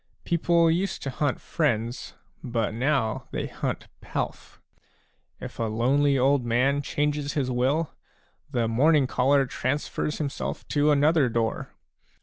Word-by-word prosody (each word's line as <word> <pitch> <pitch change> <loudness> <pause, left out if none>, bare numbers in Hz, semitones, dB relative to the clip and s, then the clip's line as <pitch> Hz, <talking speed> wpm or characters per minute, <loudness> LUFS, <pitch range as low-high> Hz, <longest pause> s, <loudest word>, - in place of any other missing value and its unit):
People 170 0 +3
used 185 +4 -1
to 135 - -3
hunt 140 +1 -1
friends, 120 -6 -2 0.3
but 115 -4 -1
now 125 -1 0
they - - -3
hunt - - -4
pelf; - - -5 0.8
if - - -9
a 115 - +1
lonely 135 +6 +2
old 135 +1 +3
man 130 +5 +2
changes 145 0 -1
his 135 -4 -1
will, 135 +6 +1 0.6
the 120 -5 0
morning 140 +5 +4
caller 135 +2 +2
transfers 145 +4 -2
himself 145 -3 -4
to 145 0 +2
another 145 -1 +4
door. 115 -1 -2
140 Hz, 130 wpm, -26 LUFS, 120-150 Hz, 0.8 s, morning